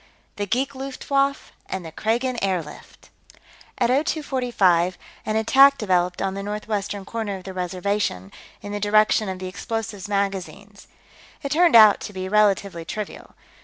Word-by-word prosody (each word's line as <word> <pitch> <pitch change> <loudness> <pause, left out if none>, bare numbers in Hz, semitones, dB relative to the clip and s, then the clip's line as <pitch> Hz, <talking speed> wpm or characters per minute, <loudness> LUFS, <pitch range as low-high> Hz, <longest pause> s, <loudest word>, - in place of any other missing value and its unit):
The 205 0 -2
Geek 255 +7 -1
Luftwaffe 275 +1 -2 0.2
and 190 -2 -5
the 160 - -8
Kragan 235 +7 -1
Airlift 180 -6 -5 0.7
At 240 -3 +1
0245, 245 - +1 0.3
an 215 - 0
attack 270 +5 +6
developed 180 -3 0
on 195 -1 -1
the 195 - -5
northwestern 205 -1 -4
corner 215 -3 -4
of 185 - -12
the 190 - -8
Reservation, 180 - -2 0.3
in 205 - -6
the 205 - -3
direction 215 0 +3
of 190 - -4
the 185 - -7
explosives 210 +1 -5
magazines. 200 0 -4 0.6
It 280 - -4
turned 335 -2 +4
out 215 -2 +8
to 205 - -8
be 185 0 -4
relatively 200 -4 +2
trivial. 210 +5 -7
205 Hz, 145 wpm, -23 LUFS, 190-230 Hz, 0.7 s, out